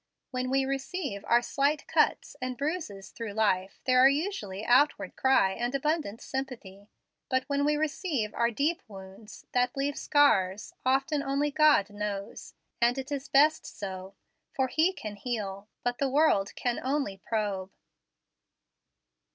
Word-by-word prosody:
When 255 Hz, 0 st, -2 dB
we 270 Hz, 0 st, +2 dB
receive 275 Hz, -, -3 dB
our 240 Hz, +1 st, +4 dB
slight 285 Hz, +4 st, 0 dB
cuts -, -, +1 dB
and 255 Hz, -1 st, -3 dB
bruises 280 Hz, -, -4 dB
through 230 Hz, -3 st, -6 dB
life, 195 Hz, -3 st, 0 dB
there 255 Hz, -1 st, +4 dB
are 265 Hz, +1 st, +8 dB
usually 275 Hz, -, -3 dB
outcry 265 Hz, -4 st, +3 dB
and 240 Hz, +6 st, -2 dB
abundant 295 Hz, -6 st, -1 dB
sympathy. 225 Hz, -7 st, -6 dB, 0.4 s
But 260 Hz, -1 st, +1 dB
when 280 Hz, +1 st, -1 dB
we 300 Hz, 0 st, +2 dB
receive 295 Hz, -, -1 dB
our 235 Hz, 0 st, +2 dB
deep 290 Hz, +9 st, 0 dB
wounds, 195 Hz, +1 st, -12 dB
that 250 Hz, +1 st, +1 dB
leave 280 Hz, +1 st, -1 dB
scars, 210 Hz, -10 st, +2 dB
often 270 Hz, +3 st, +1 dB
only 280 Hz, +1 st, 0 dB
God 300 Hz, -9 st, +4 dB
knows; 205 Hz, -1 st, -5 dB, 0.3 s
and 240 Hz, +2 st, +3 dB
it 265 Hz, +2 st, -5 dB
is 285 Hz, 0 st, -4 dB
best 300 Hz, +3 st, +4 dB
so, 190 Hz, -1 st, -7 dB, 0.4 s
for 265 Hz, -1 st, +1 dB
He 320 Hz, +7 st, +3 dB
can 215 Hz, -, -8 dB
heal, 200 Hz, -3 st, -4 dB, 0.2 s
but 245 Hz, 0 st, -1 dB
the 275 Hz, -, +1 dB
world 265 Hz, -9 st, +2 dB
can 245 Hz, -1 st, -1 dB
only 270 Hz, -7 st, -1 dB
probe. 205 Hz, -4 st, -2 dB
255 Hz, 145 wpm, -29 LUFS, 205-285 Hz, 0.4 s, are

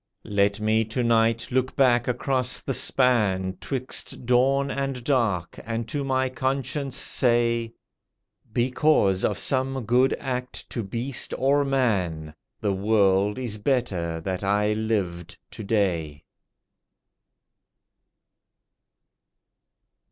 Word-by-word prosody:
Let 100 Hz, 0 st, +1 dB
me 110 Hz, +1 st, +2 dB
to 115 Hz, +3 st, -2 dB
night 115 Hz, 0 st, +2 dB
look 130 Hz, +1 st, 0 dB
back 125 Hz, -3 st, +3 dB
across 125 Hz, 0 st, 0 dB
the 135 Hz, -, -3 dB
span 105 Hz, -9 st, +2 dB
'Twixt 130 Hz, -1 st, -3 dB
dawn 135 Hz, +3 st, +2 dB
and 135 Hz, -3 st, -3 dB
dark, 115 Hz, -, 0 dB
and 115 Hz, 0 st, -4 dB
to 145 Hz, +3 st, -2 dB
my 130 Hz, -1 st, +1 dB
conscience 135 Hz, +1 st, -2 dB
say— 115 Hz, -2 st, +1 dB, 0.8 s
Because 120 Hz, -5 st, +2 dB
of -, -, 0 dB
some 130 Hz, -2 st, -1 dB
good 125 Hz, +4 st, +3 dB
act 125 Hz, -1 st, -5 dB
to 120 Hz, -, -2 dB
beast 120 Hz, +6 st, -3 dB
or 140 Hz, +2 st, +2 dB
man— 95 Hz, -, -1 dB, 0.3 s
"The 100 Hz, -2 st, 0 dB
world 100 Hz, 0 st, +2 dB
is 120 Hz, -5 st, -4 dB
better 100 Hz, -10 st, -1 dB
that 95 Hz, +3 st, -4 dB
I 105 Hz, +2 st, +1 dB
lived 100 Hz, -5 st, -3 dB
to 110 Hz, -, -8 dB
day." 85 Hz, -8 st, -1 dB
115 Hz, 105 wpm, -25 LUFS, 100-130 Hz, 0.8 s, back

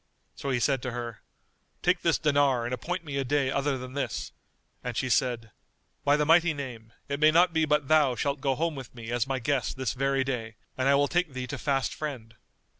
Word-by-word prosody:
So 140 Hz, -, -5 dB
he 125 Hz, -2 st, +1 dB
said 135 Hz, +1 st, +1 dB
to 125 Hz, -1 st, -4 dB
her, 120 Hz, -3 st, -5 dB, 0.6 s
"Take -, -, +2 dB
this -, -, +3 dB
dinar 140 Hz, -5 st, +2 dB
and 120 Hz, -, -3 dB
appoint 170 Hz, +7 st, -3 dB
me 140 Hz, -2 st, -4 dB
a 135 Hz, -, +1 dB
day 135 Hz, 0 st, +1 dB
other 140 Hz, 0 st, 0 dB
than 130 Hz, 0 st, -8 dB
this;" 140 Hz, 0 st, -3 dB, 0.5 s
and 125 Hz, -2 st, -4 dB
she 130 Hz, -, 0 dB
said, 115 Hz, -2 st, +1 dB, 0.5 s
"By 145 Hz, +1 st, +4 dB
the 150 Hz, -, +1 dB
Mighty 165 Hz, 0 st, +4 dB
Name, 120 Hz, -6 st, -7 dB, 0.2 s
it 140 Hz, 0 st, -3 dB
may 155 Hz, 0 st, +6 dB
not 175 Hz, +2 st, +4 dB
be 160 Hz, -1 st, +3 dB
but 150 Hz, -2 st, +1 dB
thou 150 Hz, -4 st, +4 dB
shalt 140 Hz, +2 st, -1 dB
go 135 Hz, -2 st, +1 dB
home 165 Hz, +3 st, 0 dB
with 135 Hz, -3 st, -9 dB
me 115 Hz, -1 st, -7 dB
as 120 Hz, 0 st, 0 dB
my 135 Hz, -1 st, -1 dB
guest 130 Hz, +1 st, -1 dB
this 130 Hz, -4 st, -1 dB
very 135 Hz, +1 st, +1 dB
day 115 Hz, -4 st, -4 dB, 0.2 s
and 130 Hz, +1 st, +1 dB
I 140 Hz, -, +6 dB
will 145 Hz, 0 st, +3 dB
take 175 Hz, -3 st, 0 dB
thee 130 Hz, -1 st, -4 dB
to 125 Hz, -, -5 dB
fast 135 Hz, -3 st, 0 dB
friend." 130 Hz, -7 st, -6 dB
135 Hz, 225 wpm, -28 LUFS, 125-145 Hz, 0.6 s, may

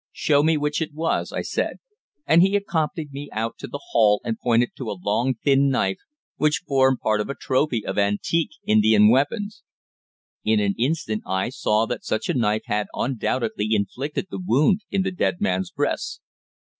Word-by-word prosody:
"Show 145 Hz, -2 st, +2 dB
me 160 Hz, +1 st, +3 dB
which 150 Hz, +1 st, -1 dB
it 155 Hz, -2 st, -4 dB
was," 165 Hz, +1 st, -1 dB
I -, -, -3 dB
said; -, -, -2 dB, 0.5 s
and 165 Hz, +1 st, +5 dB
he 195 Hz, +2 st, +3 dB
accompanied 160 Hz, -6 st, -1 dB
me 140 Hz, +1 st, -7 dB
out 115 Hz, +1 st, -3 dB
to -, -, -6 dB
the 140 Hz, -, -7 dB
hall 105 Hz, -3 st, +4 dB
and 115 Hz, -, -2 dB
pointed 120 Hz, 0 st, +2 dB
to 125 Hz, -5 st, -5 dB
a 100 Hz, -, -4 dB
long 115 Hz, +7 st, 0 dB
thin 140 Hz, 0 st, +4 dB
knife 95 Hz, -7 st, 0 dB, 0.4 s
which 150 Hz, +5 st, +1 dB
formed 130 Hz, -2 st, +3 dB
part 110 Hz, -1 st, +1 dB
of 105 Hz, -, -5 dB
a 140 Hz, -, -3 dB
trophy 130 Hz, -4 st, 0 dB
of -, -, -2 dB
antique 105 Hz, +11 st, +1 dB, 0.2 s
Indian 105 Hz, 0 st, +5 dB
weapons. 205 Hz, -, 0 dB, 0.8 s
In 110 Hz, 0 st, +2 dB
an 100 Hz, -1 st, +1 dB
instant 125 Hz, -5 st, -1 dB
I 95 Hz, +4 st, -1 dB
saw 110 Hz, -3 st, +1 dB
that -, -, -5 dB
such 110 Hz, -, -2 dB
a -, -, +2 dB
knife 110 Hz, -3 st, +1 dB
had 105 Hz, 0 st, -1 dB
undoubtedly 120 Hz, -3 st, -1 dB
inflicted 125 Hz, -, -2 dB
the -, -, -5 dB
wound 180 Hz, -, +3 dB
in 195 Hz, -1 st, 0 dB
the 190 Hz, -, -1 dB
dead 180 Hz, -1 st, -1 dB
man's 195 Hz, -3 st, 0 dB
breast. 145 Hz, -5 st, -2 dB
130 Hz, 180 wpm, -23 LUFS, 110-155 Hz, 0.8 s, and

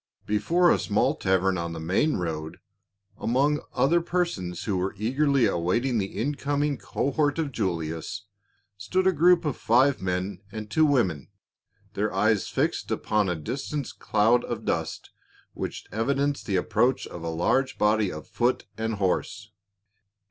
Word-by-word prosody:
Before 170 Hz, +12 st, +3 dB
a -, -, +3 dB
small -, -, +1 dB
tavern 95 Hz, -1 st, +1 dB
on 85 Hz, 0 st, -3 dB
the 80 Hz, -, -6 dB
main 95 Hz, -, +1 dB
road, 80 Hz, -3 st, -4 dB, 0.6 s
among 140 Hz, +5 st, +2 dB
other 170 Hz, +5 st, +3 dB
persons 165 Hz, -, -2 dB
who 105 Hz, -, -1 dB
were 95 Hz, +2 st, -2 dB
eagerly 135 Hz, +4 st, +2 dB
awaiting 115 Hz, +9 st, +1 dB
the 95 Hz, -1 st, -4 dB
incoming 145 Hz, +2 st, -1 dB
cohort 145 Hz, +2 st, 0 dB
of 155 Hz, -4 st, -1 dB
Julius, 85 Hz, -, -3 dB, 0.5 s
stood 185 Hz, -, 0 dB
a 190 Hz, -, +5 dB
group 175 Hz, +1 st, +4 dB
of 145 Hz, -5 st, -1 dB
five 130 Hz, +3 st, +3 dB
men 90 Hz, +1 st, -2 dB
and 110 Hz, -1 st, -7 dB
two 160 Hz, -1 st, +4 dB
women, 95 Hz, -, +1 dB, 0.7 s
their -, -, -1 dB
eyes -, -, +2 dB
fixed -, -, -1 dB
upon 105 Hz, -3 st, 0 dB
a 90 Hz, -, 0 dB
distant 135 Hz, -, -4 dB
cloud 110 Hz, +3 st, +3 dB
of 115 Hz, -2 st, -5 dB
dust 80 Hz, -1 st, -3 dB, 0.4 s
which -, -, -5 dB
evidenced 140 Hz, +6 st, 0 dB
the 100 Hz, -, 0 dB
approach 110 Hz, +7 st, +1 dB
of 85 Hz, -, -9 dB
a 85 Hz, -, -3 dB
large 130 Hz, +11 st, +1 dB
body 105 Hz, -2 st, +2 dB
of 75 Hz, -1 st, -8 dB
foot 125 Hz, +1 st, 0 dB
and 110 Hz, 0 st, -1 dB
horse. 95 Hz, -2 st, -2 dB
110 Hz, 150 wpm, -26 LUFS, 95-140 Hz, 0.7 s, a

